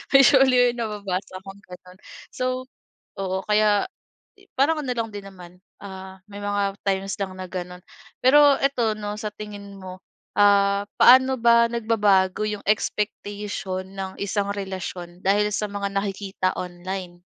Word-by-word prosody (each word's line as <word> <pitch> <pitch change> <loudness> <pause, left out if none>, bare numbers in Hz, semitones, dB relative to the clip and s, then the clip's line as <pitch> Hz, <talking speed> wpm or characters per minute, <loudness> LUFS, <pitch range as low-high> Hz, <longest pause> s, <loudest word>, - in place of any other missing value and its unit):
Usually 260 -2 +6
nababasa 200 -4 -4
kong 195 0 -11
gano'n. 180 +1 -13 0.4
So 255 0 -2 0.6
oo, 190 0 -2
kaya 210 -1 +3 0.6
eh, 395 - -23
parang 305 +3 +2
ano 270 - -5
lang 230 -1 -3
din 205 -1 -7
naman, 180 -1 -14 0.3
ah, 190 -1 -9
may 205 0 -9
mga 200 -1 -1
times 195 0 -1
lang 190 -1 -3
na 185 - -6
gano'n. 180 -1 -6 0.4
Pero 285 +1 +6
ito, 245 -6 +1
'no, 205 0 -4
sa 215 - -3
tingin 205 -1 -9
mo, 185 -1 -10 0.4
ah, 200 0 +4
paano 260 +1 +6
ba 235 0 +5
nagbabago 210 -5 +2
'yong 210 -1 -5
expectation 205 -2 -2
ng 190 -1 -6
isang 200 0 -1
relasyon 185 -2 -6
dahil 205 +2 +2
sa 210 +1 -1
mga 200 -1 -3
nakikita 195 -1 -2
online? 180 0 -6
200 Hz, 140 wpm, -23 LUFS, 190-215 Hz, 0.6 s, Usually